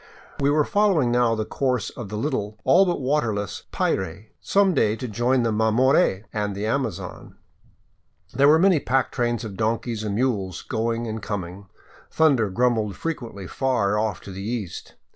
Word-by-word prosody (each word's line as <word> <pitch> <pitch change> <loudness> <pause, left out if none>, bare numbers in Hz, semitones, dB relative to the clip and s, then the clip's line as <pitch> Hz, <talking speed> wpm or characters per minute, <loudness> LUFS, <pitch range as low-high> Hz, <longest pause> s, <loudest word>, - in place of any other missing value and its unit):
We 140 - +2
were 150 +1 +3
following 195 -12 +2
now 120 -1 +3
the 110 -1 -2
course 125 -4 -1
of 115 -5 -8
the 105 - -4
little, 105 -5 -2
all 190 +2 +5
but 175 - 0
w^aterless, 120 -8 -1
PIray, 95 +3 -2
some 195 -2 +2
day 110 -7 +2
to 125 +2 -5
join 120 +3 +1
the 115 - +1
Mamore 110 - +3
and 105 -2 -2
the 100 +2 -3
Amazon. 110 -7 -3 1.0
There 140 +3 +4
were 155 +2 +7
many 180 -1 +4
pack 135 0 0
trains 120 -2 -1
of 105 -4 -6
donkeys 115 +1 -1
and 105 -2 -2
mules 100 -7 -1
going 115 +1 -2
and 110 -1 -4
coming. 100 -1 -5 0.4
Thunder 135 -10 +3
grumbled 110 -1 +1
frequently 115 - -5
far 125 -2 0
ofif 105 -2 -1
to 100 - -10
the 95 +1 -7
east. 110 -3 -5
115 Hz, 165 wpm, -24 LUFS, 105-130 Hz, 1.0 s, were